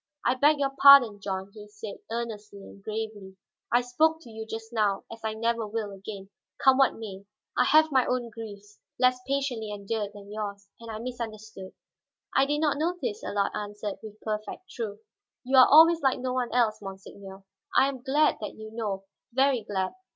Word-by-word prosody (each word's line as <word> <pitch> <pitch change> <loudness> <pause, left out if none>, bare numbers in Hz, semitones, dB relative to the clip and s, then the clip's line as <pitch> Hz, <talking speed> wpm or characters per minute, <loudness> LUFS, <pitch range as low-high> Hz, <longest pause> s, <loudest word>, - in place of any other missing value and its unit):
"I 245 - +4
beg 290 +4 +4
your 275 -1 0
pardon, 265 -7 +9
John," 195 0 -4
he 210 -1 -11
said 205 0 -9
earnestly 220 -3 -5
and 200 - -14
gravely. 215 -3 -6 0.3
"I 240 - +4
spoke 315 +6 +2
to 240 - -13
you 220 0 -7
just 225 +1 -7
now 210 -3 +1
as 225 0 -9
I 220 0 -2
never 230 0 -1
will 210 -1 -3
again, 195 0 -9 0.3
come 265 0 +5
what 270 - +4
may. 200 -3 -9 0.3
I - - +3
have 315 +1 +5
my 260 -2 +3
own 245 -2 -1
griefs, 210 -2 -10 0.2
less 255 0 +3
patiently 270 -6 -1
endured 205 0 -3
than 205 0 -12
yours; 200 -2 -5
and 230 0 -10
I 220 - -5
misunderstood." 220 -4 -7 0.6
"I 270 0 +4
did 295 +1 0
not 295 -2 +1
notice," 315 -10 -2
Allard 200 -1 0
answered, 205 0 -5
with 215 -1 -11
perfect 215 - -5
truth. 215 -3 -5 0.4
"You 265 +2 0
are 255 - +9
always 325 +2 +7
like 270 -2 +2
no 255 0 -3
one 250 -2 -1
else, 230 -4 +1
monseigneur. 195 0 -10 0.3
I 270 - +6
am 270 -2 -5
glad 295 +4 +2
that 210 - -5
you 220 0 -10
know, 210 -4 -3 0.3
very 265 -2 +3
glad. 195 -3 -2
220 Hz, 185 wpm, -27 LUFS, 205-255 Hz, 0.6 s, pardon